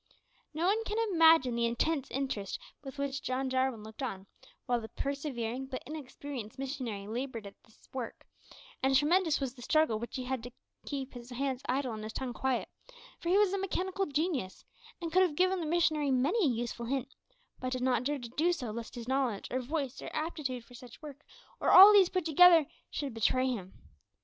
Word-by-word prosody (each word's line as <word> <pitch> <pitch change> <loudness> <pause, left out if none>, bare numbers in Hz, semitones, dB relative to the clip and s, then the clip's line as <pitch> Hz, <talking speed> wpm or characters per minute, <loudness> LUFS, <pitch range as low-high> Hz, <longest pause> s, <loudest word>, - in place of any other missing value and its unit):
No 320 +2 -2
one 425 +4 +2
can 425 0 -3 0.2
imagine 325 -6 +6
the 235 0 +1
intense 275 +4 0
interest 260 -8 -3 0.3
with 270 0 -8
which 280 0 -2
John 260 +1 -2
Jarwin 260 -4 0
looked 220 +4 -10
on 195 -7 -4 0.4
while 245 -1 0
the 220 - -8
persevering 265 -3 -3
but 260 -1 -6
inexperienced 275 -5 -7
missionary 260 -7 -4
laboured 235 0 -4
at 200 - -9
this 220 - -24
work, 255 -3 -6 0.6
and 265 +1 +3
tremendous 320 +3 +3
was 270 -3 -3
the 255 - -14
struggle 285 -4 +2
which 235 - -6
he 255 - -3
had 255 -1 -2
to 245 +2 -9 0.4
keep 275 -2 -4
his 245 0 -10
hands 260 +1 -2
idle 260 -1 0
and 215 - -6
his 215 +1 -6
tongue 260 -2 -4
quiet; 260 +2 -1 0.5
for 340 - -3
he 375 - +5
was 410 -2 +4
a 395 - 0
mechanical 380 0 -1
genius, 290 - -2 0.3
and 335 -2 -4
could 370 - +6
have 355 -5 +2
given 370 +3 +2
the 325 - -3
missionary 310 -3 +2
many 290 - +2
a 250 - +1
useful 235 0 -4
hint, 265 0 -2 0.5
but 255 0 -3
did 255 -1 -2
not 255 -2 +2
dare 290 +3 0
to 240 -3 -8
do 315 +8 +1
so 260 -10 -3
lest 230 +2 -7
his 235 -1 -7
knowledge, 260 -6 0
or 255 - 0
voice, 275 0 -3
or - - -6
aptitude 280 -7 -3
for 245 - -17
such 245 -1 -12
work, 295 0 -10 0.4
or - - +1
all 395 +3 +11
these 390 -3 +6
put 370 -3 -1
together, 335 0 +7 0.2
should 280 -4 -4
betray 240 +3 +2
him. 195 -7 -4
265 Hz, 200 wpm, -31 LUFS, 240-310 Hz, 0.6 s, all